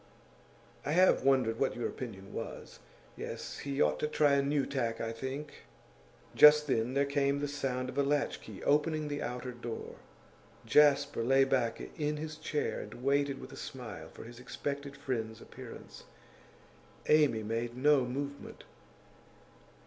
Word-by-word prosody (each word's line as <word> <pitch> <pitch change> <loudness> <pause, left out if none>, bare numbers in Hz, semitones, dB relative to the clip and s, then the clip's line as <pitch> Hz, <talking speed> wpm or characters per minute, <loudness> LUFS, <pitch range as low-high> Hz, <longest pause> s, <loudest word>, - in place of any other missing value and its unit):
'I 145 - -1
have 185 +2 +5
wondered 130 -4 +3
what 135 - +1
your 120 - -2
opinion 100 -6 -8
was. - - -7 0.4
Yes, - - -6
he 140 -1 -4
ought 75 0 +3
to - - 0
try 150 -1 +3
a 140 - +4
new 140 0 +1
tack, 120 -4 -2
I 115 - -2
think.' 135 +5 -6 0.7
Just 150 0 +8
then 125 -2 0
there 140 0 +3
came 140 0 +1
the 145 - -1
sound 135 -3 -2
of 130 - -3
a - - +6
latch 145 +1 0
key - - -10
opening 150 +1 +2
the 145 0 -3
outer 125 +1 -4
door. 120 -1 -7 0.7
Jasper 145 -4 +4
lay 135 +3 +5
back 125 -4 +1 0.2
in 150 0 0
his 155 0 -6
chair 150 - -2
and 125 - -9
waited 140 0 +1
with - - -10
a - - -9
smile 105 -11 -8
for - - -11
his 120 +1 -11
expected 140 +3 -5
friend's 110 -4 -3
appearance; - - -11 1.0
Amy 150 -8 +4
made 115 +2 -3
no 145 0 +4
movement. 140 +3 -5
135 Hz, 155 wpm, -32 LUFS, 120-145 Hz, 1.0 s, Just